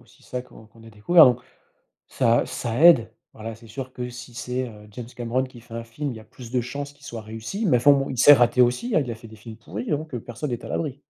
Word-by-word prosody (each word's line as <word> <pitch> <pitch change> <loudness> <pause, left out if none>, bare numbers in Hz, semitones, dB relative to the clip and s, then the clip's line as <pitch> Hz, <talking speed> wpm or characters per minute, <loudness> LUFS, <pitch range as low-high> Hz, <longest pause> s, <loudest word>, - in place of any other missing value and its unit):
aussi - - -24
ça 125 0 -5
qu'on 115 -3 -16
qu'on 115 +1 -19
a 115 - -12
découvert 155 +11 +6
donc, 125 -1 +3 0.7
ça 120 -3 +2
ça 120 +1 -3
aide 130 -10 +6 0.2
voilà, 110 +1 -7
c'est 115 +1 -16
sûr 130 +2 -7
que 125 0 -5
si 120 0 -10
c'est, 125 +1 -3
heu, 105 -2 -14
James 115 +3 -8
Cameron 120 +2 -1
qui 125 -3 -12
fait 115 -1 -18
un 115 0 -5
film, 140 +5 -5
il 120 - -7
y - - -9
a 110 - -15
plus 120 0 -12
de 125 0 +1
chances 140 +4 -6
qu'il 145 0 -17
soit 115 -2 -7
réussi, 115 - -5
mais 150 - +4
enfin 145 +5 +5
bon, 135 -1 +1
il 130 - -5
s'est 145 +4 +9
raté 120 0 +3
aussi 125 - 0
hein, - - +5
il 125 - -6
a - - -3
fait 115 +1 -13
des 110 - -13
films 110 +1 -11
pourris, 110 0 -7
hein, 150 - +2
donc, 155 0 -8
heu, 120 - -3
personne 125 +6 -6
n'est 120 - -4
à - - -7
l'abri. 145 -3 -3
125 Hz, 285 wpm, -24 LUFS, 115-135 Hz, 0.7 s, s'est